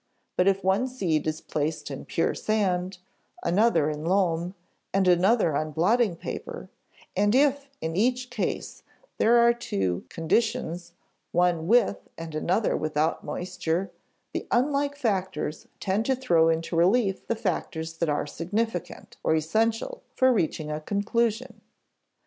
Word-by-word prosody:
But 180 - +3
if 195 0 +2
one 190 +7 +2
seed 175 - -1
is 155 0 -2
placed 150 0 -3
in 135 - -6
pure 165 - 0
sand, 190 -3 0 0.5
another 200 -4 +3
in 150 0 -3
loam, 175 0 +1 0.4
and 195 -1 +2
another 180 -1 +4
on 155 +2 -1
blotting 205 +4 +2
paper, 480 - -7 0.4
and 205 +4 +3
if 280 0 +3
in 160 0 -3
each 250 +5 +1
case 235 -4 -3 0.4
there 235 +2 +5
are 235 0 +6
two 95 - -2
conditions, 175 -1 -1 0.4
one 175 -2 +2
with 230 -1 +4 0.2
and 165 -1 -7
another 180 +7 +1
without 155 +1 0
moisture, 180 +1 -2 0.4
the - - -4
unlike 280 +3 +1
factors 190 - -2
tend 195 +4 0
to 265 - +3
throw 170 -11 +3
into 165 +1 -1
relief 195 +4 +2
the 230 - 0
factors 165 -6 -3
that 170 -1 0
are 145 - 0
significant 180 +5 -3
(or 160 - +3
"essential") 225 - 0
for 260 0 +4
reaching 155 -6 -1
a 150 0 -3
conclusion. 225 +6 -1
190 Hz, 135 wpm, -26 LUFS, 165-230 Hz, 0.5 s, are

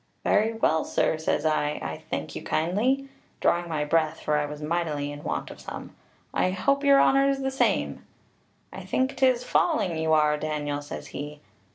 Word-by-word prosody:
'Very 220 +2 +2
well, 160 -8 +2
sir,' 155 - 0
says 160 -1 0
I, 150 -1 +1
'I 80 0 -5
thank - - -4
you - - -5
kindly,' 225 +12 0 0.3
drawing 175 0 +1
my 150 -2 -1
breath, 160 +1 +1
for 150 - 0
I 150 0 +1
was 150 0 -7
mightily 150 -2 -2
in 145 0 -8
want - - -3
of - - -11
some. - - -8 0.4
'I - - +2
hope 275 +10 +1
your 280 -1 +6
honour's 275 0 +4
the 270 0 -2
same.' 265 - 0 0.7
'I - - -7
think 260 +1 0
'tis 255 -2 +3
falling 250 - +1
you 160 0 +1
are, 150 -1 +4
Daniel,' 145 -1 -2
says 145 - -7
he. 145 +1 -7
160 Hz, 180 wpm, -26 LUFS, -, 0.7 s, your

